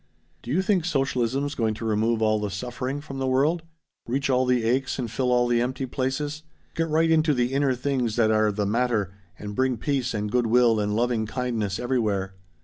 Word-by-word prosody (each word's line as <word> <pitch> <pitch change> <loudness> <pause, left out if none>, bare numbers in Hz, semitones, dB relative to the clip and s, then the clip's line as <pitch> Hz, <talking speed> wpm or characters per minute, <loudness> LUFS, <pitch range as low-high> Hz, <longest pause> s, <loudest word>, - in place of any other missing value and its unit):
"Do - - -10
you 175 +8 +1
think 190 -3 +2
socialism's 135 -3 0
going 110 -4 0
to 115 - -6
remove 110 +1 +1
all 110 0 +2
the 105 -1 -2
suffering 125 +7 -4
from 135 -3 -7
the 135 - -1
world? 145 +6 +2 0.5
Reach 135 +3 0
all 130 0 +2
the 125 -2 +2
aches 130 +4 0
and 120 -4 -4
fill 125 +3 0
all 125 0 +3
the 120 -1 +2
empty 130 +2 -2
places? 140 +4 -3 0.3
Get 165 0 -1
right 160 +1 +2
into 155 -2 +3
the 125 +1 0
inner 140 -2 +2
things 125 -3 -1
that 110 -2 +3
are 110 -1 +3
the 105 0 -1
matter 110 -3 0 0.2
and 105 0 -7
bring 130 +2 +1
peace 130 -1 -1
and 105 0 -2
good 120 -1 +2
will 115 -1 +4
and 105 0 -1
loving 115 -1 0
kindness 110 -5 -2
everywhere?" 105 -6 -1
125 Hz, 205 wpm, -25 LUFS, 110-135 Hz, 0.5 s, will